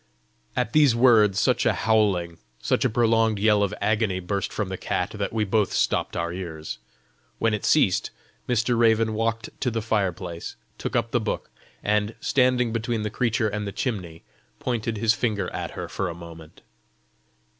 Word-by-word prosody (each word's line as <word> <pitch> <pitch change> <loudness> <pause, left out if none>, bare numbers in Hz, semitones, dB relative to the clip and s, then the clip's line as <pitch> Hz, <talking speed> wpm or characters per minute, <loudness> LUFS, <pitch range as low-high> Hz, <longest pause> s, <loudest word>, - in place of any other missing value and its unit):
At 115 - -1
these 145 -6 +5
words 110 -5 +5
such - - +2
a - - +3
howling, 100 -7 +1 0.2
such - - 0
a - - +3
prolonged 115 -1 +2
yell 105 0 +3
of 100 -1 +1
agony 105 -2 +1
burst 95 +2 -2
from 105 -3 -3
the 95 - -3
cat, 90 +1 -2
that 105 -2 -3
we 110 -1 0
both 105 0 +1
stopped - - 0
our 85 0 -2
ears. 80 -8 -6 0.6
When 115 -1 +1
it 105 - -2
ceased, 120 -12 +3 0.4
Mr. 120 0 +2
Raven 115 -1 +3
walked 115 +1 -1
to 130 - +1
the 115 -1 -2
fire 105 -4 +1
place, 85 -1 -7 0.2
took - - -4
up - - 0
the - - +2
book, - - -3 0.3
and, 105 +1 +1
standing 125 -3 +2
between 115 -1 -1
the 105 - -3
creature 110 -2 +1
and 105 0 -3
the - - -3
chimney, 90 -10 -4 0.3
pointed 115 - -2
his 110 +1 +3
finger 110 -4 -1
at - - -4
her - - -4
for 95 - -3
a 85 - -6
moment. 85 -2 -12
105 Hz, 175 wpm, -25 LUFS, 95-115 Hz, 0.6 s, these